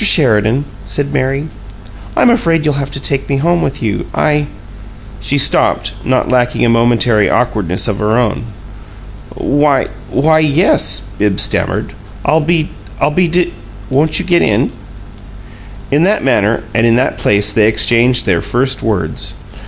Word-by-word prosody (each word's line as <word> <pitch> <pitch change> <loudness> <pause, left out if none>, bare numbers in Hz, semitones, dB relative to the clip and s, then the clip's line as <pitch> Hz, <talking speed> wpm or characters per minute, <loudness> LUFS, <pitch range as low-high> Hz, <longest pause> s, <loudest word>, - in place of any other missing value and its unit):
Sheridan," 125 - +3 0.2
said 145 0 -3
Mary, 135 +2 -1 0.7
"I'm 240 - +5
afraid 165 -9 +1
you'll 145 -2 0
have 140 - -4
to 140 - -4
take 135 0 -2
me 140 - 0
home 170 +4 +1
with 140 -1 -3
you. 105 -3 -2
I 150 -1 +1 0.4
" 110 -1 -18
She 110 +7 -1
stopped, 140 - +2
not 130 0 0
lacking 125 -1 +1
a - - +2
momentary 115 -2 +2
awkwardness 105 -8 -1
of 105 -3 -2
her 105 +2 +1
own. 115 -2 -1 0.9
"Why 145 -2 +1 0.2
why 155 +4 +2
yes," 150 - +2 0.2
Bibbs 105 -2 +2
stammered. - - -2 0.3
"I'll 155 +1 +2 0.6
I'll - - +1
be 180 +3 +1
de 175 -2 0 0.4
Won't 150 +4 +2
you 185 - -2
get 175 -1 +2
in?" 105 - +1 1.2
In 145 +2 +2
that 200 +5 +1
manner 115 -4 +1
and 115 +1 +2
in 115 - +3
that 130 +2 0
place 105 0 +1
they 105 0 +3
exchanged 115 +3 +2
their 90 -4 +1
first 130 +2 -1
words. 90 -9 -2
130 Hz, 150 wpm, -13 LUFS, 110-150 Hz, 1.2 s, I'm